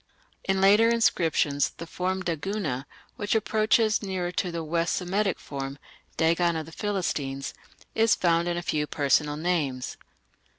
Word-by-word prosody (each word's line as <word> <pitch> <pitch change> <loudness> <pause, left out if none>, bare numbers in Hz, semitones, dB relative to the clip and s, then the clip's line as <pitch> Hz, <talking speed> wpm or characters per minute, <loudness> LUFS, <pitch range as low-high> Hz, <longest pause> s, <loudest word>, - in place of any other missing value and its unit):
In 195 0 +1
later 205 +4 +6
inscriptions 165 -10 +2
the 170 - -6
form 185 +2 -2
Daguna, 160 -5 -2 0.3
which 205 +1 -1
approaches 220 0 +2
nearer 185 -3 -2
to 180 0 -1
the 170 -1 -3
West 165 +2 0
Semitic 195 +1 0
form 135 -1 -6 0.4
(Dagon 170 +1 +2
of 160 -1 -3
the 165 - -12
Philistines), 160 -9 -2 0.4
is 225 0 +4
found 170 -1 +2
in 175 0 -1
a 175 - -3
few 150 -2 -1
personal 145 0 +1
names. 150 -7 -1
175 Hz, 140 wpm, -27 LUFS, 150-195 Hz, 0.4 s, later